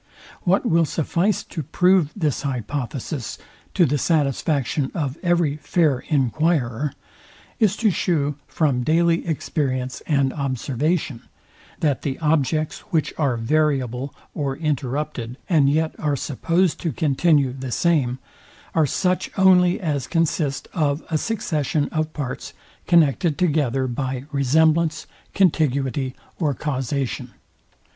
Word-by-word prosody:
What 190 +6 +3
will 165 -6 +3
suffice 170 +6 0
to 165 - -6
prove 180 +2 +3
this 155 - -1
hypothesis 135 0 -4 0.4
to 180 - +5
the 145 0 0
satisfaction 145 -2 +1
of 145 -5 -2
every 170 -5 +1
fair 150 -2 +1
enquirer, 145 -2 +1 0.7
is 215 -4 +3
to 220 -3 +3
shew 150 -6 0
from 140 -6 +1
daily 165 +4 +2
experience 130 -5 -2
and 140 -4 +2
observation, 140 0 -1 0.6
that 145 -4 +1
the 135 -2 -3
objects, 155 0 0
which 155 -3 0
are 135 -6 +1
variable 135 0 0 0.2
or 140 -3 -2
interrupted, 140 -4 -2
and 150 -6 +4
yet 160 +2 +1
are 150 -2 0
supposed 165 +6 0
to 165 - -1
continue 145 -1 +2
the 130 -1 -6
same, 140 -5 +1 0.6
are 160 -3 +3
such 180 +5 0
only 180 -2 +5
as 145 -8 -2
consist 160 -4 0
of 150 -2 0
a 155 - +2
succession 155 - -1
of 155 0 -2
parts, 135 -5 -5 0.3
connected 165 -2 +3
together 140 -7 +1
by 130 0 -3
resemblance, 155 +3 +2 0.3
contiguity, 140 -7 +1 0.2
or 150 -6 +1
causation. 135 -2 -3
150 Hz, 120 wpm, -22 LUFS, 135-165 Hz, 0.7 s, to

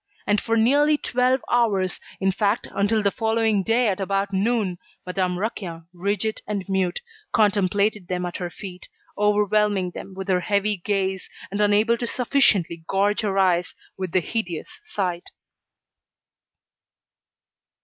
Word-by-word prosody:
And 205 0 +2
for 230 - 0
nearly 290 +7 +4
twelve 255 -1 +1
hours, 200 -6 +1 0.2
in 195 0 +2
fact 205 +3 0
until 210 +2 +1
the 200 - +3
following 220 -2 +1
day 230 +5 +2
at 195 -2 0
about 195 +1 -1
noon, 200 -3 0 0.3
Madame 180 -1 -1
Raquin, 180 -5 -4
rigid 200 +4 -1
and 200 -3 -3
mute, 190 -2 0 0.3
contemplated 205 -2 +2
them 180 -1 -2
at 175 - -4
her 175 -1 -4
feet, 180 0 -9 0.3
overwhelming 210 -2 +2
them 190 +2 -9
with 190 0 -6
her 185 -2 +2
heavy 200 +2 +1
gaze, 190 0 -2 0.2
and 200 +1 -1
unable 210 +3 +3
to 240 - -2
sufficiently 215 - +2
gorge 200 +3 +1
her 200 -3 -1
eyes 180 -2 +2 0.2
with 185 -2 -4
the 185 - +3
hideous 180 -4 -4
sight. 180 -3 -3
200 Hz, 140 wpm, -23 LUFS, 185-220 Hz, 0.3 s, nearly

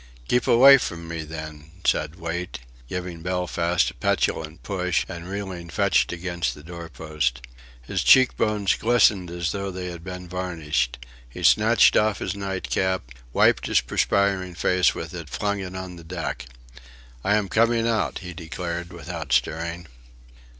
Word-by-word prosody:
"Keep 125 -1 +1
away 135 +3 +8
from 85 -7 -5
me 85 -1 -4
then," 80 0 -8
said 75 +1 +1
Wait, 85 0 -4 0.3
giving 90 -2 -5
Belfast 90 -1 0
a - - -17
petulant 80 +1 -1
push, 90 -3 0
and 85 0 -7
reeling 95 -4 -5
fetched 95 -1 +2
against 85 0 -2
the 75 - -13
doorpost. 80 -6 -3 0.4
His - - -2
cheekbones 105 -6 +4
glistened 105 -6 +3
as 85 -2 -2
though 100 -1 -3
they 90 -1 -5
had 85 -1 -9
been 90 -1 -7
varnished. 80 -9 -2 0.3
He - - -9
snatched - - +5
off 105 -1 +3
his - - -3
night 95 -2 -4
cap, 95 -10 -1 0.2
wiped - - +3
his - - +3
perspiring 100 -3 0
face 90 -1 +2
with - - -6
it, - - -7
flung 100 -1 -1
it 95 -1 -6
on 95 -1 -6
the 85 - -11
deck. 85 -5 -5 0.8
"I 105 - +3
am 105 -2 +1
coming 115 +3 +2
out," 110 -5 0
he 90 - -6
declared 85 +1 -5
without 85 -4 -7
stirring. 80 +7 0
90 Hz, 150 wpm, -24 LUFS, 80-95 Hz, 0.8 s, away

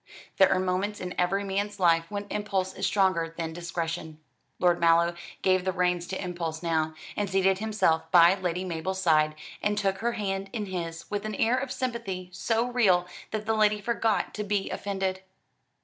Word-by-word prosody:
There 190 - +6
are 185 - +3
moments 185 +3 -1
in 180 0 -5
every 195 +3 +1
man's 200 +1 -2
life 165 -2 +3
when 205 0 -4
impulse 195 -3 -1
is - - -1
stronger 170 -5 +1
than 165 -1 -3
discretion. 165 -2 -4 0.4
Lord 175 -1 +3
Mallow 170 0 +4 0.3
gave 185 -1 +3
the 190 - 0
reins 180 -1 0
to 190 - -4
impulse 170 -3 -4
now, 160 -2 0 0.2
and 205 -2 -1
seated 190 0 +2
himself 200 -7 +1
by 175 0 +7
Lady 185 -1 -2
Mabel's 185 +2 -3
side, 155 -4 +3 0.3
and 210 0 0
took 195 -2 0
her 235 +1 0
hand 195 -2 -3
in 215 -4 -2
his, 170 -3 -5
with 205 0 -2
an 215 -1 -4
air 230 +5 +2
of 260 0 -2
sympathy 215 -8 -3
so 225 +5 0
real 200 -8 +3 0.2
that 215 -1 -4
the 220 - +1
lady 215 -1 +3
forgot 225 0 0
to 210 - -3
be 205 -1 -1
offended. 190 -2 -2
190 Hz, 180 wpm, -27 LUFS, 175-205 Hz, 0.4 s, by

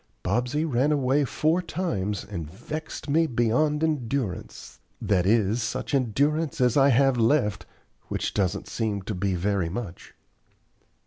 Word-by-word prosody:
"Bobsey 125 - 0
ran 140 0 +1
away 140 0 +2
four 160 +7 +1
times, 105 - -3
and 85 -7 -6
vexed 155 - -7
me 160 +3 +3
beyond 135 +5 +1
endurance, 125 - -3 0.2
that 95 -3 +1
is, 110 +1 +2
such 120 +5 -3
endurance 140 +5 +1
as 125 -2 +3
I 140 0 +5
have 135 0 +4
left, 115 -2 +1 0.4
which - - -2
doesn't 100 0 -1
seem 105 -4 -2
to 105 - -4
be 95 0 -1
very 95 -1 0
much." 95 -2 -7
120 Hz, 135 wpm, -26 LUFS, 100-145 Hz, 0.4 s, I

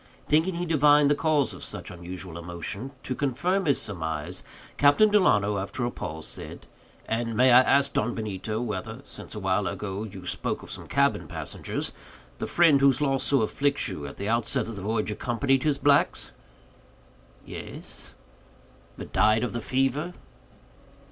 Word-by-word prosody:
Thinking 165 +4 +2
he 175 +1 -2
divined 150 -2 +5
the - - +6
cause 150 -3 +1
of - - -9
such - - -4
unusual 90 0 -7
emotion, 85 +8 -5
to - - -2
confirm 175 +9 0
his 140 - +4
surmise, 80 -6 -3 0.4
Captain 145 +10 +5
Delano, 105 - +3
after 110 +5 -3
a 120 - -2
pause, 80 -6 -6
said: - - -6 0.4
"And 115 0 -2
may 130 0 +6
I 125 +1 +9
ask, 140 +2 +3
Don 120 - 0
Benito, 110 0 -3
whether—since 115 +3 -5
awhile 95 -1 0
ago 100 -1 -4
you 95 -4 -9
spoke - - -3
of - - -10
some - - -6
cabin - - +1
passengers—the 60 0 -6
friend, 160 -5 +4
whose 140 0 +4
loss 135 -2 +1
so 140 -5 +3
afflicts 140 +5 0
you, 75 -7 -6
at 70 - -10
the 100 - -4
outset 115 +2 +1
of 115 - -6
the 100 - -6
voyage 110 +2 -1
accompanied 125 +5 0
his 145 -1 +1
blacks?" 145 0 +2 1.1
"Yes." - - -9 0.8
"But - - -9
died 110 +2 +4
of 125 - -2
the 120 - -3
fever?" 135 +8 0
120 Hz, 155 wpm, -26 LUFS, 100-140 Hz, 1.1 s, I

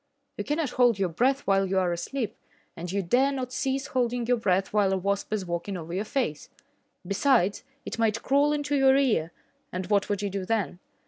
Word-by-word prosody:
You - - -1
cannot 295 -2 -1
hold 245 -4 +3
your 190 -2 0
breath 260 - +1
while 195 -1 +2
you 190 +1 0
are 180 -2 +2
asleep, 225 +5 -3 0.4
and 175 +1 -6
yet 200 - -2
you 195 -3 -2
dare 265 +8 +3
not 255 -2 -4
cease 270 -1 -1
holding 245 -3 -1
your 245 +1 +2
breath 195 -3 0
while 205 -2 +3
a - - +1
wasp 200 +2 -2
is 210 -3 -1
walking 175 +3 -3
over 165 0 -7
your 195 +4 -1
face. 215 - -2 0.6
Besides, 200 0 +2 0.2
it - - -5
might 225 0 +1
crawl 285 +2 +3
into 290 -1 -1
your 270 -1 +5
ear, 215 - +1 0.4
and 185 +1 -3
what 205 0 +2
would 205 0 -1
you 200 - -2
do 195 0 -3
then? 205 -3 -1
210 Hz, 210 wpm, -27 LUFS, 190-265 Hz, 0.6 s, your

